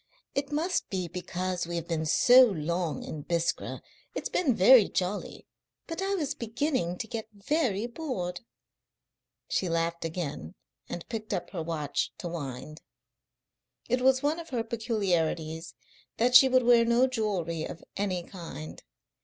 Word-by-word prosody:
It 280 0 -2
must 330 +5 0
be 185 -3 -2
because 180 0 -3
we 170 - -4
have 170 -1 -3
been 160 -2 -1
so 250 +10 +7
long 170 -4 -2
in 155 - -6
Biskra. 170 +2 -2 0.3
It's - - -3
been 280 -10 +2
very 220 +3 +7
jolly, 185 +3 -3 0.4
but 330 +2 -5
I 390 +1 0
was 300 -5 -1
beginning 230 - -1
to 225 - -4
get 225 -2 -5
very 215 0 0
bored." 235 - -4 1.1
She 185 - 0
laughed 165 0 -1
again 155 - -4 0.3
and 175 - -6
picked 220 -2 -3
up - - -5
her 175 - -3
watch 155 -3 -2
to 175 - -5
wind. 145 -2 -6 1.1
It 250 +1 +1
was 260 +1 +4
one 300 +3 +1
of 330 -1 -9
her 240 -5 -1
peculiarities 175 -8 -1 0.4
that 245 +3 +2
she 265 +2 +9
would 255 0 +4
wear 240 -1 +6
no 235 +2 +4
jewellery 195 -10 -1
of 165 - -9
any 190 -3 -1
kind. 165 -4 -9
195 Hz, 150 wpm, -29 LUFS, 170-250 Hz, 1.1 s, she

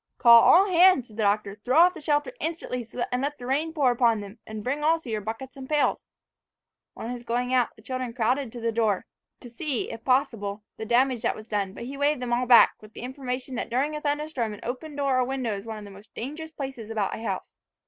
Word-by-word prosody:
"Call 235 -2 +8
all 380 - +6
hands!" 360 - +5
said 215 - -15
the - - -1
Doctor. 205 0 0
"Throw 255 +4 +1
off 355 +2 +7
the - - -10
shelter 295 +7 0
instantly, 315 -7 -3
to 240 +2 -3
let 280 +4 -1
the 245 - -9
rain 290 +5 0
pour 285 -6 +2
upon 235 -2 +3
them; 205 +2 -10
and 220 -1 -6
bring 280 +5 -2
also 320 -5 +1
your 215 -1 -1
buckets 225 +5 -6
and 265 -1 -9
pails." 300 -1 +1 0.9
On 230 - -5
his 245 -1 -6
going 245 +2 -1
out, 250 -2 +2
the 220 - -19
children 255 0 -4
crowded 245 +2 0
to 240 - -7
the 230 0 -1
door, 220 -4 +1 0.4
to - - -10
see, 250 +2 -3
if 225 - -8
possible, 225 -6 0
the 220 - -5
damage 250 0 +2
that - - 0
was 215 - -11
done; 200 -4 -2
but - - -8
he 270 +3 -7
waved 285 0 +1
them 245 -1 -2
all 245 +1 +1
back, 240 -2 +8
with 215 0 -15
the - - -9
information 255 0 -5
that - - -3
during 275 +6 0
a 300 - -5
thunder 295 +1 -1
storm 235 -9 -3
an - - -14
open 275 +5 -5
door 275 -2 +1
or - - +3
window 250 -4 -2
is 200 +3 -8
one 220 -1 -5
of 210 - -9
the 200 - -11
most 200 +2 -15
dangerous 300 +6 -6
places 265 -7 -6
about 215 -3 -1
a - - -8
house. 230 - -4
250 Hz, 245 wpm, -26 LUFS, 225-280 Hz, 0.9 s, Call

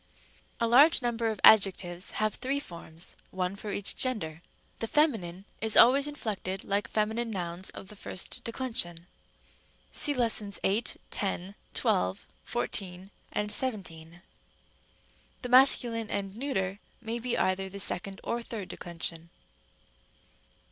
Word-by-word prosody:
a. 230 - +2
A - - +1
large 275 +5 +6
number 235 -1 0
of 220 -3 -2
adjectives 190 -4 +5
have 215 0 0
three 275 +2 -2
forms, 170 - -8
one 185 0 -2
for 205 +1 -6
each 200 0 0
gender. 175 -11 -2 0.4
The 225 - -2
feminine 205 - +1 0.2
is 220 -1 +4
always 275 +4 +7
inflected 205 -9 -3
like 200 +1 0
feminine 220 +2 -1
nouns 180 -2 -3
of 195 - -10
the 210 - -10
first 205 +5 -5
declension 225 -9 -2 0.9
(δὲ 230 - +2
8, 210 +4 0
10, 195 -1 -3 0.2
12, 90 +1 0 0.2
14, 190 -5 -3 0.4
17): 175 -8 -2 1.2
the 250 - -4
masculine 240 -3 +5
and 195 -1 -3
neuter 205 -7 -2 0.2
may 230 0 -4
be 240 +1 -2
either 185 +1 0
of - - -12
the 200 - -7
second 195 +1 -1
or 235 - -2
third 215 -5 -7
declension. 170 -1 -5
205 Hz, 125 wpm, -29 LUFS, 185-235 Hz, 1.2 s, always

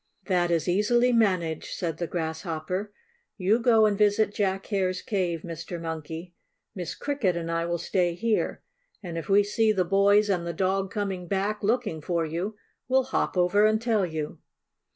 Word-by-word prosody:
"That 175 -2 +1
is 170 0 +1
easily 240 +7 +3
managed," 185 -8 +1
said 165 -3 -3
the 170 - -2
Grasshopper. 170 +3 -3 0.5
"You 205 +4 +2
go 225 -2 +5
and 210 -1 +2
visit 210 0 +2
Jack 195 -2 -1
Hare's 185 -3 0
cave, 180 -6 -1
Mr. 170 0 -6
Monkey. 165 +1 -6 0.4
Miss 175 -4 -5
Cricket 260 -11 -1
and 165 -1 -3
I 165 0 -1
will 170 0 -1
stay 175 0 0
here, 225 +4 -1 0.4
and 170 -3 -6
if 165 - -5
we 200 +1 +5
see 215 +2 +2
the 190 -4 +1
boys 200 +3 +4
and 180 -4 0
the 170 - -2
dog 190 +2 0
coming 195 -4 -3
back, 200 +3 -1
looking 210 -6 0
for 170 +1 -1
you, 175 +7 -3 0.3
we'll 260 +1 +3
hop 255 -6 -1
over 180 +4 +4
and 215 0 +2
tell 225 -3 +1
you." 160 -4 -4
190 Hz, 175 wpm, -26 LUFS, 170-210 Hz, 0.5 s, go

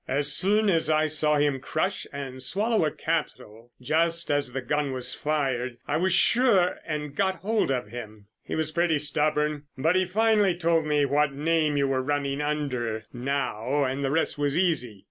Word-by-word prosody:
As 140 +2 +1
soon 210 +5 +3
as 165 -5 +2
I 155 0 +3
saw 150 0 +1
him 145 -2 +1
crush 155 +8 -2
and 135 -2 -7
swallow 205 - +1
a - - +1
capsule 120 -9 -4
just 165 +6 +1
as 145 -3 0
the 135 - -3
gun 145 +1 -1
was 125 0 -1
fired, 130 -5 -2
I 145 - 0
was 185 +3 +1
sure, 205 -2 +3
and 150 -2 -4
got 190 +1 +1
hold 215 -1 0
of 125 -6 -2
him. 110 -3 -9 0.2
He - - -6
was 160 -1 -1
pretty 170 -1 +1
stubborn, 150 0 0
but 160 +7 +1
he 185 -1 +2
finally 210 -2 +2
told 165 -2 +1
me 150 -1 +2
what 145 +1 +1
name 155 0 0
you 140 -1 +2
were 135 -1 0
running 140 0 -2
under 130 -7 -2
now, 135 +1 -1
and 135 +1 -2
the 135 - 0
rest 160 0 0
was 145 +1 +1
easy. 155 - +1
150 Hz, 185 wpm, -26 LUFS, 135-165 Hz, 0.2 s, soon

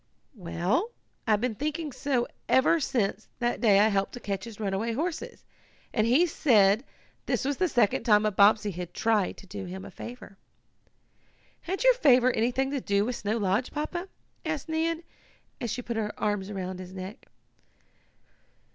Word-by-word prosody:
"Well, 185 - -1 0.4
I've 215 -1 +3
been 250 -2 0
thinking 300 +5 -3
so 260 -2 -1 0.2
ever 260 +5 +4
since 220 -7 -1
that 240 0 -1
day 205 -5 +5
I 215 +2 +5
helped 195 -1 0
to 245 - -6
catch 200 -2 -4
his 225 -3 -10
runaway 210 +2 -1
horses, 325 +6 -4 0.5
and 215 -1 +2
he 270 +9 +5
said 220 - +4 0.4
this - - 0
was 280 0 0
the 370 - +2
second 230 -6 +2
time 210 -3 +4
a 215 - +2
Bobbsey 205 +1 +4
had 175 -1 -7
tried 220 -4 +1
to - - -13
do 195 0 -7
him 185 +1 -7
a - - -10
favor.'" 235 -5 -10 1.2
"Had 380 +6 -3
your - - +7
favor 255 - +5
anything 250 +4 0
to 280 -2 -2
do 200 -1 +1
with 245 +1 -2
Snow 210 +2 -1
Lodge, 205 +3 0
Papa?" 345 +5 -4 0.4
asked 315 -3 -3
Nan, 325 +1 -1 0.6
as 235 - -2
she 245 +3 -3
put 235 -1 -4
her 210 -1 -3
arms 205 -2 -1
about 185 -2 -5
his 185 0 -9
neck. 190 +6 -8
225 Hz, 170 wpm, -28 LUFS, 200-270 Hz, 1.2 s, your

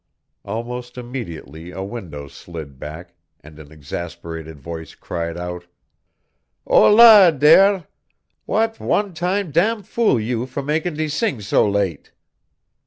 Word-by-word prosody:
"_ - - -13
Almost 120 +3 -5
immediately 90 -10 -7
a 95 +1 -6
window 90 -10 -7
slid 75 -3 -10
back, 80 +5 -9 0.3
and 75 +1 -15
an 75 -1 -13
exasperated 80 +1 -7
voice 80 +3 -8
cried 85 -1 -5
out: 90 0 -6 1.0
"Hólà 210 -7 +7
dere, 180 +6 +5 0.6
w'at 225 0 0
one 205 -2 0
time 180 +2 -2
dam 205 +7 +1
fool 215 - +1
you 120 +2 -2
for 140 +2 -5
mak' 155 +4 -1
de 155 -3 -2
sing 150 - -1
so 105 0 +2
late!" 100 -6 -2
115 Hz, 125 wpm, -20 LUFS, -, 1.0 s, Hólà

